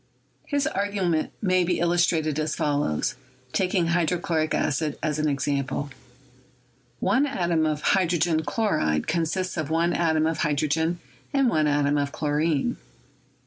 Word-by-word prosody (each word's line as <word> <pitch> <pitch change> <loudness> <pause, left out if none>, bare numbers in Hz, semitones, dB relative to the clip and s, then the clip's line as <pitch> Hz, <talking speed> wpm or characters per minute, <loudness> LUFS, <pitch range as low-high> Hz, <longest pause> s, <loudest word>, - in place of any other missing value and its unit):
His 285 -1 0
argument 195 -5 -1
may 185 -2 +3
be 175 0 0
illustrated 170 -3 +1
as 155 0 -1
follows, 145 - 0 0.4
taking 185 -2 +1
hy 170 0 +2
drochloric 165 -2 0
acid 150 +1 0
as 155 0 -1
an 155 0 +1
example: 140 0 -1 1.1
One 260 +10 +2
atom 170 - 0
of 150 -1 -2
hydrogen 170 -4 +2
chloride 80 - 0
consists 170 +3 -1
of 155 -2 -2
one 165 +2 +1
atom 160 -2 +2
of 160 0 -1
hydrogen 155 +2 0 0.4
and 275 -3 +4
one 155 -1 +2
atom 145 0 +2
of 140 0 -1
chlorine. 155 - 0
160 Hz, 135 wpm, -25 LUFS, 150-175 Hz, 1.1 s, and